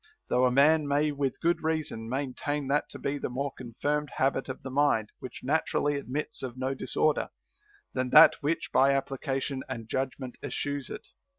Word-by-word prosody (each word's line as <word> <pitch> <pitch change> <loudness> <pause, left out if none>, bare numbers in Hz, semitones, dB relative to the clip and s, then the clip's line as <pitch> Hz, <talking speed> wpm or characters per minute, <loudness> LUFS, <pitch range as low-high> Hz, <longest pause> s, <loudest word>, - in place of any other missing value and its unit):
Though 125 +1 +3
a - - +1
man 150 +3 +4
may 145 +2 +2
with 140 -2 -2
good 170 +1 +2
reason 155 -8 -2
maintain 140 +2 -2
that 145 +1 +1
to - - -9
be 145 +1 -2
the - - -3
more 135 +3 -2
confirmed 145 +5 -2
habit 135 0 +1
of 130 - -6
the 130 - -6
mind 130 -6 +2
which 130 - -9
naturally 145 0 +1
admits 140 +1 -4
of 130 -1 -6
no 130 +1 -1
disorder, 150 +2 0 0.6
than 130 -1 -1
that 155 +5 +8
which 155 +3 -1
by 135 +1 +5
application 135 0 -2
and 115 -4 -5
judgment 130 0 -3
eschews 145 0 -3
it. - - -8
140 Hz, 175 wpm, -29 LUFS, 130-145 Hz, 0.6 s, that